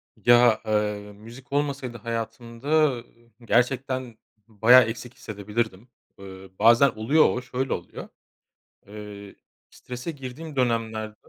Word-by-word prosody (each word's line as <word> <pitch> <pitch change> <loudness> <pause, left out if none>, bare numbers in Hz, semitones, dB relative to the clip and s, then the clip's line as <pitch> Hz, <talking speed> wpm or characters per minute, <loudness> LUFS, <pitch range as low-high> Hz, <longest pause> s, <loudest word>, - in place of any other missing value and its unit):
Ya, 120 -2 +4
eee, 105 -1 -1
müzik 115 +6 -14
olmasaydı 140 -4 -2
hayatımda, 115 +2 -6 0.3
ııı, 120 0 -9 0.4
gerçekten 130 +1 0
b - - -35 0.3
bayağı 115 +4 +6
eksik 115 +2 -6
hissedebilirdim. 105 +1 -4 0.3
Eee, 95 0 -11
bazen 115 +5 +6
oluyor 130 +9 +3
o, 125 - -2
şöyle 130 +1 -3
oluyor. 85 - -7 0.8
Eee, 105 -1 -10 0.3
strese 125 +6 -7
girdiğim 145 +2 -9
dönemlerde 110 -4 -1
115 Hz, 110 wpm, -25 LUFS, 105-125 Hz, 0.8 s, bayağı